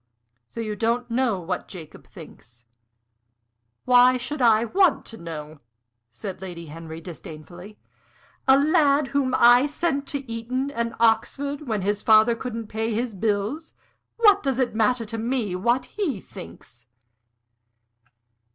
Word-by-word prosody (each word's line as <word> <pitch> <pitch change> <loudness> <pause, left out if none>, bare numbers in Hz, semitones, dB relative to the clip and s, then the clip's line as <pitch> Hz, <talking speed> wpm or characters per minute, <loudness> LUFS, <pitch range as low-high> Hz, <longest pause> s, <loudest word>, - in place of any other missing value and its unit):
"So - - -9
you 215 -2 -3
don't 235 +2 -1
know 235 -5 +1
what 180 +1 -4
Jacob 165 -5 -11
thinks?" 120 +1 -14 1.2
"Why 250 0 +6
should 265 +4 -5
I 225 -1 +4
want 365 - +2
to 225 - -11
know?" 155 -3 -8 0.5
said 190 - -8
Lady 175 -3 -7
Henry, 160 +1 -9
disdainfully. 175 +3 -11 0.7
"A 265 0 +7
lad 290 -2 +3
whom 265 -2 0
I 245 +3 +6
sent 285 -2 -2
to 280 -2 -5
Eton 250 +4 -3
and 235 -3 -3
Oxford, 275 +6 0
when 215 -4 -1
his 205 +1 -1
father 220 +1 +5
couldn't 230 -2 -5
pay 220 +2 -3
his 235 0 -2
bills 215 - -2 0.4
what 410 -3 +5
does 270 -3 -1
it 255 -4 0
matter 230 +2 +1
to 225 +1 -6
me 230 -5 -1
what 240 +7 +1
he 325 - -3
thinks?" 115 - -13
230 Hz, 135 wpm, -24 LUFS, 195-265 Hz, 1.2 s, A